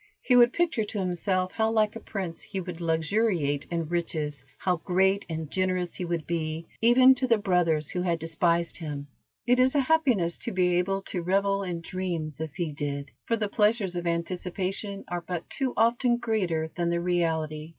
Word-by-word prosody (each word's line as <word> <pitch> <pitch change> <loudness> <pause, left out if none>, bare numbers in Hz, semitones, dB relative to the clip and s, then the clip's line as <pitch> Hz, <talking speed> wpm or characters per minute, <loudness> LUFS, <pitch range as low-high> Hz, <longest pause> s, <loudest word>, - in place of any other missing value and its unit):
He 250 - +3
would 240 0 +7
picture 325 -9 +1
to 210 0 -6
himself 185 0 0
how 220 0 +1
like 215 -1 +2
a - - -5
prince 185 -7 -5
he 195 - -5
would 175 -2 -6
luxuriate 165 -3 +1
in 165 -2 -2
riches, 155 -4 -2
how 180 -2 0
great 190 +3 +1
and 160 -2 -4
generous 185 -1 0
he 180 - -4
would 170 -2 -2
be, 160 -1 -3 0.2
even 255 +3 +7
to 255 0 -1
the 230 -2 +4
brothers 175 -7 +1
who 180 -2 -2
had 175 -2 +1
despised 170 +1 0
him. 145 -4 -5 0.4
It 245 +1 +3
is 260 +2 +4
a - - +5
happiness 255 - +2
to - - -4
be 180 -1 +2
able 195 +2 -1
to 180 - -4
revel 195 +3 +1
in 175 -3 -4
dreams 165 -4 -4
as 160 -1 -4
he 170 -4 -2
did, 140 -1 -4
for 230 - +1
the 215 -2 -1
pleasures 210 -3 +1
of 175 0 -2
anticipation 185 +4 -3
are 175 0 -3
but 175 0 -5
too 265 -2 -1
often 240 +1 +3
greater 180 -9 -1
than 170 -1 0
the 170 0 +1
reality. 160 -3 -1
180 Hz, 190 wpm, -27 LUFS, 165-210 Hz, 0.4 s, would